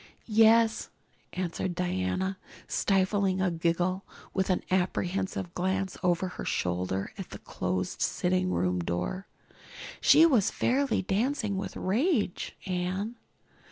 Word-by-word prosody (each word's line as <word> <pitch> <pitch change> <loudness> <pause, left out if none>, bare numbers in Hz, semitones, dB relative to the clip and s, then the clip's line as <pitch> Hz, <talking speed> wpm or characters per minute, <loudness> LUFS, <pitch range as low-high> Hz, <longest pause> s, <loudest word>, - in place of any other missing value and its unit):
"Yes," 225 0 +4 0.4
answered 180 0 -2
Diana, 180 - -1 0.3
stifling 195 -1 +1
a 185 -1 +2
giggle 175 +3 0 0.3
with 190 0 0
an 185 - +1
apprehensive 185 0 -1
glance 190 +1 -1
over 180 0 +1
her 180 - -7
shoulder 90 +2 -1
at - - -6
the - - -7
closed - - -3
sitting 90 0 +1
room 90 +1 +1
door. 90 - -3 0.7
"She 325 - +7
was 250 - +4
fairly 270 -3 +1
dancing 215 +2 0
with 190 - -4
rage, 220 - 0
Anne. 185 +5 -2
185 Hz, 115 wpm, -29 LUFS, 175-205 Hz, 0.7 s, She